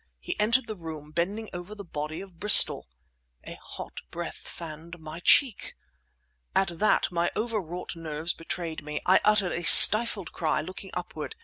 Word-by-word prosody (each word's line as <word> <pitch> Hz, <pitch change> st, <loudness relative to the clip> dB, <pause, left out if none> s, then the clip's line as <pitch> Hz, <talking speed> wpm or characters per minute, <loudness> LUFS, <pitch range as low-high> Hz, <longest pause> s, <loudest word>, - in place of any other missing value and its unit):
He -, -, -5 dB
entered 230 Hz, +5 st, +1 dB
the 220 Hz, -, -8 dB
room, 160 Hz, -4 st, -11 dB
bending 195 Hz, +7 st, -4 dB
over 175 Hz, +4 st, -9 dB
the 205 Hz, -, -10 dB
body 155 Hz, -1 st, -7 dB
of 190 Hz, -4 st, -15 dB
Bristol. 210 Hz, -, +6 dB, 0.6 s
A -, -, -9 dB
hot -, -, -11 dB
breath -, -, -9 dB
fanned 165 Hz, +1 st, -11 dB
my 160 Hz, 0 st, -11 dB
cheek! 240 Hz, +4 st, +1 dB, 0.8 s
At 175 Hz, -4 st, -1 dB
that 215 Hz, -, 0 dB
my 175 Hz, 0 st, -1 dB
overwrought 200 Hz, -7 st, -6 dB
nerves 160 Hz, 0 st, -6 dB
betrayed 165 Hz, -1 st, -7 dB
me. 150 Hz, 0 st, -6 dB
I 185 Hz, -, +3 dB
uttered 210 Hz, -4 st, +1 dB
a 175 Hz, -, -4 dB
stifled 210 Hz, 0 st, +7 dB
cry, 160 Hz, -2 st, -3 dB
looking 185 Hz, +4 st, -10 dB
upward 175 Hz, -4 st, -8 dB
175 Hz, 155 wpm, -25 LUFS, 160-205 Hz, 0.8 s, stifled